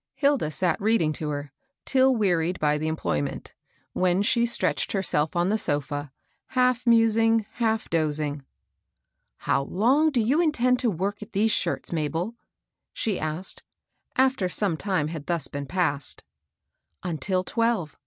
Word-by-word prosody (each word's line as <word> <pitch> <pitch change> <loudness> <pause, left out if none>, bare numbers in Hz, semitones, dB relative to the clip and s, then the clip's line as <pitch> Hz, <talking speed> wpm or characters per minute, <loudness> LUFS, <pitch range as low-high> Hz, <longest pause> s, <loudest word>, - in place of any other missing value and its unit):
Hilda 280 - +2
sat 170 +6 -1
reading 200 -8 +2
to 150 0 -4
her, 145 -1 -4 0.3
till 265 -1 +4
wearied 180 -5 +1
by 150 0 +1
the 155 - -2
em 160 - -1
ployment; 75 - -3 0.4
when 185 +1 +2
she 235 +1 +2
stretched 235 - 0
herself 180 -4 +2
on 175 +2 +2
the 215 +2 +1
so&» 145 -3 -2 0.4
half 250 -1 +1
musing, 225 -1 +4
half 225 -2 -1
dozing. 150 -3 0 0.5
" - - -55
How - - +3
long 250 - +2
do 275 -5 0
you 260 +9 +2
intend 255 -6 +2
to 245 - +2
work 200 +3 -3
at 210 - -10
these 215 +2 +2
shirts, - - -1
Mabel? 165 +6 -2 0.3
" - - -61
she 210 -5 -1
asked, 155 +4 -3 0.5
after 260 -8 +2
some 185 0 +1
time 170 -4 -1
had 155 -3 -7
thus 170 -5 -1
been 140 -1 -6
passed. 160 -7 -1 0.8
Until 185 +2 -1
twelve. 230 -9 -1
185 Hz, 155 wpm, -25 LUFS, 155-230 Hz, 0.8 s, till